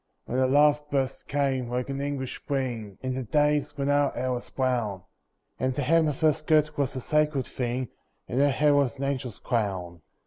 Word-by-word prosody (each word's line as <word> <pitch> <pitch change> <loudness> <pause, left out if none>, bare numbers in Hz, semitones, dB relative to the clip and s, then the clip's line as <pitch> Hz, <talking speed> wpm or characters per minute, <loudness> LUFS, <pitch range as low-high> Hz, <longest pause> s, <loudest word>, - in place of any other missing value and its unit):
When 125 - -1
the 130 - +4
love 145 +2 +4
burst 135 -1 -1
came, 135 -3 0
like 125 +1 -2
an 140 0 -3
English 140 -2 -3
Spring, 120 -8 -3
In 130 0 -1
the 130 - -2
days 150 +5 +1
when 140 -1 -1
our 145 0 +3
hair 130 +1 -2
was 125 -1 -4
brown, 120 -8 -1 0.6
And 130 0 0
the 145 - -1
hem 165 +4 +4
of 150 0 -3
her 155 -1 +5
skirt 155 -1 +2
was 140 -1 -1
a - - -2
sacred 150 0 +1
thing 125 0 -3 0.4
And 125 - -1
her 145 +1 +5
hair 145 +2 +3
was 140 -4 +2
an 135 - -4
angel's 130 -5 -2
crown. 95 -7 -2
135 Hz, 200 wpm, -27 LUFS, 125-145 Hz, 0.6 s, her